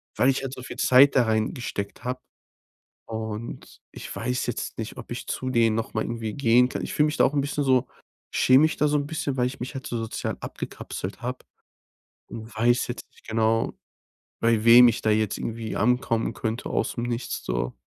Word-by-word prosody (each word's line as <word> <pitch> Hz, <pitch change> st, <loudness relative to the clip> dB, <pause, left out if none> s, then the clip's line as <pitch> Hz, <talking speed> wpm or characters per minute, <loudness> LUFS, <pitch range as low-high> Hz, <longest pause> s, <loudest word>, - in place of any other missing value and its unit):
weil 130 Hz, -, +4 dB
ich 135 Hz, -, +1 dB
halt 135 Hz, -1 st, -5 dB
so 130 Hz, -, -8 dB
viel -, -, -8 dB
Zeit 135 Hz, +2 st, +6 dB
da 125 Hz, -, +6 dB
reingesteckt 110 Hz, -1 st, -2 dB
habe. 125 Hz, +1 st, -2 dB, 0.9 s
Und, 110 Hz, 0 st, -6 dB
ich -, -, -8 dB
weiß 125 Hz, +2 st, -2 dB
jetzt -, -, -4 dB
nicht, -, -, -5 dB
ob -, -, -10 dB
ich -, -, -6 dB
zu 130 Hz, -, -3 dB
denen 115 Hz, -3 st, +3 dB
noch 115 Hz, -, -3 dB
mal 110 Hz, -, +1 dB
irgendwie 115 Hz, -2 st, -4 dB
gehen 125 Hz, -1 st, +4 dB
kann. -, -, -4 dB
Ich -, -, -4 dB
fühle 150 Hz, -, +4 dB
mich 150 Hz, -, -2 dB
da -, -, +6 dB
auch 145 Hz, -, +1 dB
'n 140 Hz, -, +3 dB
bisschen 145 Hz, +1 st, -2 dB
so 130 Hz, -1 st, +3 dB, 0.5 s
schäme 130 Hz, +3 st, +5 dB
mich 155 Hz, -, +2 dB
da 150 Hz, -, +2 dB
so 150 Hz, 0 st, +2 dB
'n 145 Hz, 0 st, -1 dB
bisschen, 145 Hz, -3 st, -3 dB
weil 125 Hz, -1 st, +2 dB
ich 135 Hz, +2 st, -5 dB
mich 130 Hz, +3 st, -5 dB
halt 135 Hz, -, -6 dB
so 120 Hz, -, -3 dB
sozial 115 Hz, -1 st, -3 dB
abgekapselt 95 Hz, +2 st, -6 dB
habe. 125 Hz, +1 st, -3 dB, 0.9 s
Und 110 Hz, 0 st, -9 dB
weiß 120 Hz, +2 st, +3 dB
jetzt 120 Hz, -, -6 dB
nicht -, -, -23 dB
genau, 110 Hz, 0 st, +1 dB, 0.7 s
bei 115 Hz, -2 st, +2 dB
wem 120 Hz, +1 st, +9 dB
ich 115 Hz, -, -2 dB
da 110 Hz, -, +1 dB
jetzt 105 Hz, -1 st, +1 dB
irgendwie 115 Hz, -1 st, -4 dB
ankommen 115 Hz, 0 st, +1 dB
könnte 110 Hz, +2 st, -3 dB
aus -, -, -1 dB
'm 120 Hz, -, -1 dB
nichts 120 Hz, 0 st, -3 dB
so. -, -, -2 dB
120 Hz, 210 wpm, -25 LUFS, 110-130 Hz, 0.9 s, wem